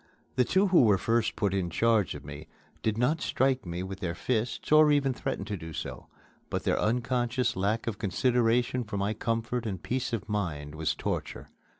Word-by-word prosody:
The 125 - +4
two 190 +9 +2
who 180 - +6
were 105 -5 +5
first 115 +4 +1
put 100 -3 0
in 95 -3 0
charge 110 -1 +2
of 70 -1 -9
me 70 +2 -8 0.3
did 110 -1 0
not 130 +7 +1
strike 130 -5 +1
me 85 +1 -3
with 95 0 -6
their 85 -4 -3
fists 120 +7 -2
or 155 0 +7
even 140 -2 +2
threaten 130 -5 -3
to 105 -1 -3
do 80 -3 -8
so; - - -6 0.4
but - - -2
their - - +1
unconscious 125 +2 0
lack 100 +6 0
of 115 -4 -3
consideration 120 +4 +1
for 105 -2 -5
my 100 +2 0
comfort 115 +1 -2
and 95 -4 -4
peace 130 0 -2
of 115 -4 -3
mind 80 -9 -3
was 80 0 -1
torture. - - -4
115 Hz, 195 wpm, -29 LUFS, 95-125 Hz, 0.4 s, or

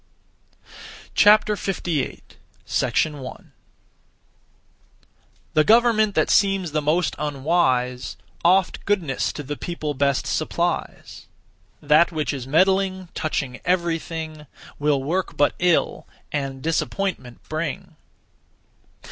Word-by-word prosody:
58. 195 -7 +2 0.3
1. 145 -5 -2 2.0
The 155 - +4
government 220 -1 +4
that - - +2
seems 195 -4 +2
the 155 0 0
most 160 +4 +1
unwise, 135 -4 0 0.3
Oft 185 +2 +3
goodness 175 -10 0
to 145 - -7
the 145 +2 -5
people 155 -2 -4
best 140 -1 +1
supplies; - - -3 0.6
That 155 +4 +4
which 155 -2 -2
is 130 -2 -6
meddling, 190 +3 +2
touching 140 -5 -3
everything, 165 -3 -2 0.3
Will 145 -2 +1
work 180 +6 -2
but 145 - +3
ill, 175 -2 +1 0.2
and 135 -2 -3
disappointment 165 -5 -2
bring. 155 -1 -4
155 Hz, 90 wpm, -23 LUFS, 145-185 Hz, 2.0 s, The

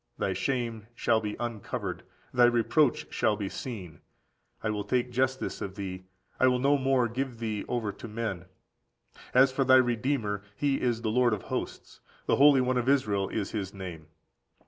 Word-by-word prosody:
Thy - - 0
shame 115 -5 -2
shall 115 -2 +2
be 105 -1 -3
uncovered, 120 -4 -4 0.3
thy 120 0 +6
reproach 120 +3 +2
shall 110 - +2
be 100 -2 -4
seen: 95 - -7 0.6
I 110 - 0
will 105 -1 -2
take 125 +3 0
justice 130 +1 -1
of 95 -1 -5
thee, 95 -2 -6 0.3
I 130 - +5
will 125 -1 +3
no 140 +3 +3
more 135 -3 +2
give 125 +1 -3
thee 110 -3 -3
over 115 -4 -1
to 115 - -10
men. 105 -5 -4 0.9
As 130 +1 +6
for 135 +1 +1
thy 130 0 +6
Redeemer, 120 -4 +1
(He 140 +1 0
is) 120 -2 0
the 110 - 0
Lord 120 0 +3
of 100 - -10
hosts, - - -5 0.3
the - - +2
Holy 140 -1 +7
One 125 0 +1
of 125 +2 0
Israel 105 -8 +2
is 105 -3 -3
his 100 -2 -4
name. 85 -5 -8
120 Hz, 175 wpm, -28 LUFS, 105-130 Hz, 0.9 s, Holy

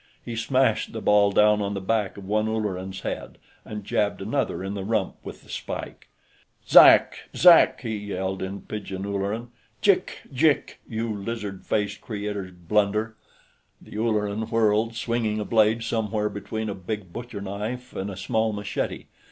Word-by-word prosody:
He 120 - -5
smashed 120 0 +1
the 110 - -4
ball 105 -1 +4
down 105 +1 +4
on 100 0 -2
the - - -2
back 100 0 -1
of 100 - -9
one 105 +2 +1
Ulleran's 95 -4 -3
head, - - -5 0.3
and 105 -1 -7
jabbed 100 +1 0
another 100 -3 -2
in 95 +1 -3
the 100 -1 -4
rump 105 -2 -1
with - - -9
the - - -20
spike. - - -6 0.6
"Zak! - - +7
Zak!" 175 -1 +7
he 110 -3 -3
yelled, 95 -2 -3
in 95 +1 -4
pidgin 100 -2 -5
Ulleran. 100 +4 -3 0.3
"Jik 200 -3 +2
jik, 145 +2 +2
you 115 0 -2
lizard 100 -2 -5
faced 105 -1 -1
Creator's 105 -3 -4
blunder!" 105 +5 0 0.6
The - - -13
Ulleran 105 -1 -1
whirled, 115 0 +2
swinging 115 -2 -1
a 105 - -2
blade 110 0 +3
somewhere 110 -2 -1
between 110 +2 -4
a 100 - -2
big 95 -1 -6
butcherknife 115 +2 -5
and 95 +1 -3
a 95 - -7
small 110 +2 0
machete. 105 0 -3
105 Hz, 155 wpm, -25 LUFS, 100-115 Hz, 0.6 s, Zak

